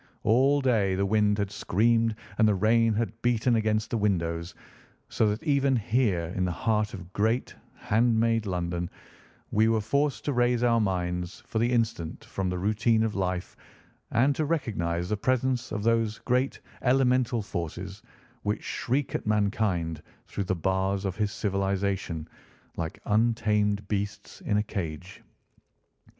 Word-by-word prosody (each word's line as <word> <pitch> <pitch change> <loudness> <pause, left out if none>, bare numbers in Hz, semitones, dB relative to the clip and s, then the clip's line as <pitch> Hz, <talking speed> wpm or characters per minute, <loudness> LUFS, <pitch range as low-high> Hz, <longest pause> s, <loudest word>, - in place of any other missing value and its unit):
All 135 +6 +4
day 110 -8 +2
the 100 +1 +1
wind 105 0 +2
had 100 -1 -1
screamed 115 +3 +2 0.2
and 110 - +6
the 105 - +3
rain 115 +3 +3
had 115 +1 -2
beaten 120 0 +2
against 110 0 0
the 115 - 0
windows, 85 -4 -1 0.5
so 110 - +2
that 105 +6 -3
even 140 -3 +2
here 105 -7 0
in 95 - 0
the 90 - 0
heart 105 +4 0
of 90 -1 -11
great, 110 +4 0 0.2
hand 115 +1 +2
made 115 -1 +1
London 90 -1 -2 0.6
we 110 +1 +4
were 115 -1 +3
forced 130 +1 0
to 145 - 0
raise 120 -1 +2
our 115 -1 +4
minds 90 -2 -2
for 110 - -2
the 120 +2 +2
instant 115 -9 -1
from 95 -1 -3
the 90 - -2
routine 110 +4 +2
of 110 -2 -1
life 90 -2 -2 0.5
and 135 +5 +3
to 155 - 0
recognise 90 - -1
the 105 - 0
presence 130 +2 0
of 105 -1 -3
those 115 -1 +1
great 125 +2 0 0.2
elemental 125 -3 +2
forces 95 +2 -5 0.4
which 105 +1 -2
shriek 130 +3 -1
at - - -3
mankind 100 -6 0 0.2
through 100 - -4
the 95 - 0
bars 95 +3 0
of 95 -2 -2
his 105 -1 0
civilisation, 95 -5 -1 0.5
like 80 -1 -4
untamed 105 -2 +1
beasts 100 -1 -4
in 105 - +1
a 105 - +2
cage. 90 -4 -6
105 Hz, 155 wpm, -27 LUFS, 95-115 Hz, 0.6 s, and